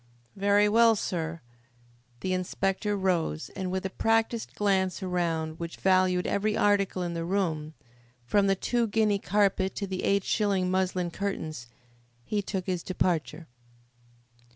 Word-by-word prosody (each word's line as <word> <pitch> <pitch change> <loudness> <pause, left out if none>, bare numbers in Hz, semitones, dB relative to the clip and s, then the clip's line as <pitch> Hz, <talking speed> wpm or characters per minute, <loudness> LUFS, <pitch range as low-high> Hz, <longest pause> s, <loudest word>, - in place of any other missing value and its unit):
"Very 205 +1 +3
well, 230 +1 +5
sir." 165 -4 -3 0.8
The 185 - -1
inspector 195 +3 -1
rose, 175 -4 -1
and 190 -1 -3
with 190 +1 -2
a 190 - -2
practised 225 +1 0
glance 190 -2 +1
around, 165 -3 -1
which 170 0 -6
valued 185 -1 +3
every 210 +1 0
article 200 -3 +2
in 175 -1 -3
the 165 0 -3
room, 165 -4 -1 0.5
from 200 - +2
the 195 - +3
two 235 +4 0
guinea 210 -1 +2
carpet 195 -1 +1
to 200 - -2
the 190 -1 -4
eight 200 0 +2
shilling 195 -4 +1
muslin 185 -2 0
curtains, 160 -9 -4 0.6
he 210 +6 -1
took 190 -2 -4
his 180 -3 -2
departure. 170 -3 -1
190 Hz, 140 wpm, -28 LUFS, 175-200 Hz, 0.8 s, well